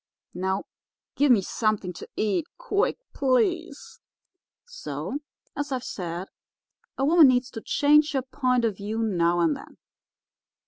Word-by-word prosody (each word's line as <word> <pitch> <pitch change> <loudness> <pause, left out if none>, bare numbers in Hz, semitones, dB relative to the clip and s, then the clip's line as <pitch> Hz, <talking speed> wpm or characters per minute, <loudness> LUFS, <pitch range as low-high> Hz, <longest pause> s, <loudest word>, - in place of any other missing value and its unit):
Now 190 +2 -1 0.5
give 285 -1 +4
me 210 -6 +5
something 210 -3 -1
to - - -10
eat, 215 - 0
quick, - - 0 0.2
please.' 280 +4 0 0.7
"So, 485 - -5 0.4
as 290 +1 -3
I've 255 -2 -2
said, 175 -2 -5 0.7
a 270 - +1
woman 320 0 +7
needs 250 0 +2
to 225 - -7
change 300 +4 +3
her 265 -2 0
point 255 -2 0
of 210 -4 -1
view 215 +3 -3
now 175 -4 +2
and 160 -3 +2
then. - - -12
250 Hz, 135 wpm, -26 LUFS, 195-290 Hz, 0.7 s, woman